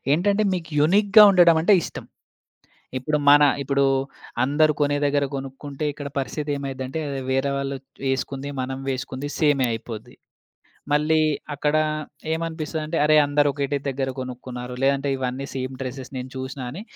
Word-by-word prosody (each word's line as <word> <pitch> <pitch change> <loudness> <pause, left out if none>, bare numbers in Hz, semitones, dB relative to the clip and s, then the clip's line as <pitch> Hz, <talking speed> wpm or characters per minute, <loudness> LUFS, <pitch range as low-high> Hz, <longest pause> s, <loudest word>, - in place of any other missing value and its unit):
ఏంటంటే 200 +7 +2
మీకు 165 -3 -4
యూనిక్‌గా 200 +7 +6
ఉండడం 175 -3 +6
అంటే 175 +6 +4
ఇష్టం. - - -7 0.9
ఇప్పుడు 150 +4 0
మన 145 +1 +8 0.2
ఇప్పుడు 140 0 +1 0.6
అందరూ 150 +4 +3
కొనే 145 0 +2
దగ్గర 145 0 +2
కొనుక్కుంటే 135 +2 -6
ఇక్కడ 145 0 -7
పరిస్థితేమైద్దంటే 140 -1 -3 0.3
వేరే 135 +1 +1
వాళ్ళు 140 0 -3 0.3
వేసుకుంది 135 +1 -2
మనం 130 +1 -4
వేసుకుంది 130 +1 -4
సేమే 145 -4 +3
అయిపోద్ది. 115 -1 -7 0.8
మళ్ళీ 150 +2 +3 0.4
అక్కడ 150 +1 0 0.6
ఏమనిపిస్తదంటే 160 -1 -3
అరే! 155 0 +5
అందరూ 145 0 +2
ఒకటే 140 0 -1
దగ్గర 135 0 -2
గొనుక్కున్నారు 125 -1 -7
లేదంటే 140 +1 +2
ఇవన్నీ 130 +1 -3
సేమ్ 130 0 -4
డ్రెసెస్ 130 0 -6
నేను 130 0 -5
చూసినా 130 0 -5
అని 175 +10 -7
140 Hz, 130 wpm, -23 LUFS, 130-155 Hz, 0.9 s, మన